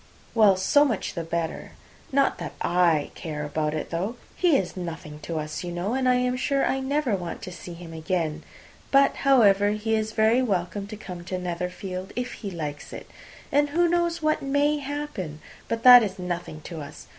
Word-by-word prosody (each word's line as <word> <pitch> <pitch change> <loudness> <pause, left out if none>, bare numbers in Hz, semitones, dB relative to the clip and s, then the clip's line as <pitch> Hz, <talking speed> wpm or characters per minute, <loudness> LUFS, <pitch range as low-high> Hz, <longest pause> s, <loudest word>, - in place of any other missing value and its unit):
"Well, 210 -4 +5
so 240 +10 +4
much 235 -9 -1
the 170 - -3
better. 165 0 -4 0.4
Not 275 0 +2
that - - -5
I 170 -4 +2
care 150 -2 -5
about 150 +1 -1
it, 155 - -4
though. 190 +8 -2 0.2
He 345 -6 +4
is 185 - -3
nothing 160 -4 -6
to 160 +2 -5
us, 155 +2 -4
you 175 - -4
know, 175 +6 -2
and 260 -1 +1
I 250 - +5
am 250 0 +1
sure 275 +1 +1
I 270 - 0
never 265 -3 0
want 175 -3 -6
to 185 - -6
see 175 0 -9
him 170 -1 -10
again. 160 -1 -2 0.5
But, 275 0 +4
however, 205 -7 +5
he 215 +1 -2
is 220 0 0
very 220 +3 +4
welcome 200 -3 -1
to 215 +1 -8
come 180 -4 -8
to 185 - -3
Netherfield, 180 +1 -5
if 245 0 -3
he 205 - -6
likes 150 -5 -6
it. - - -9 0.4
And 290 +1 +3
who 345 +4 +3
knows 340 -1 0
what 310 0 +2
may 285 +2 +1
happen? 280 - -5 0.3
But 230 0 -3
that 250 -1 +11
is 200 -3 -2
nothing 175 -3 -5
to 165 0 -7
us. 145 - -10
195 Hz, 195 wpm, -25 LUFS, 170-260 Hz, 0.5 s, that